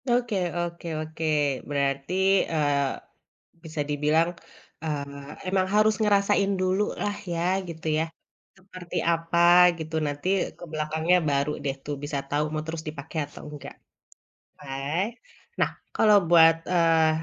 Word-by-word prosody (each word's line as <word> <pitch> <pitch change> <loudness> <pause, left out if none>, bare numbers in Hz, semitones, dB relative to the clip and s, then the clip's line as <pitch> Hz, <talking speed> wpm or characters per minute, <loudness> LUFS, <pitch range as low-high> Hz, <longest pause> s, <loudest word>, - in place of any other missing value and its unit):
Oke 240 -2 +1 0.2
oke 170 0 -4
oke, 160 +1 -5 0.4
berarti, 140 +2 -1 0.4
eee, 145 -3 +1 0.7
bisa 160 -2 -4
dibilang, 150 +3 +2 0.5
eee, 140 -2 -5 0.2
emang 185 0 +1
harus 215 0 +4
ngerasain 200 -1 +3
dulu 185 +2 +1 0.2
lah 205 0 0 0.2
ya, 165 - -2 0.3
gitu 160 -1 -7
ya. - - 0 0.5
Seperti 185 -2 -8 0.2
apa 165 +1 -1 0.4
gitu 160 0 -6
nanti 145 +4 -4 0.3
ke - - -12
belakangnya, 160 +3 +1
baru 140 +1 +1
deh 135 -1 -1
tuh 145 - -3
bisa 145 0 -3
tau 145 +1 +1
mau 155 0 -2
terus 160 0 -4
dipake 150 +1 -8
atau 145 - -13
enggak. 150 -2 -9 0.9
Ah, 140 +8 -2 0.5
nah, - - +3 0.3
kalau 210 -1 +6
buat, 165 -1 +7 0.2
eee, 165 -2 +4
160 Hz, 130 wpm, -26 LUFS, 145-180 Hz, 0.9 s, buat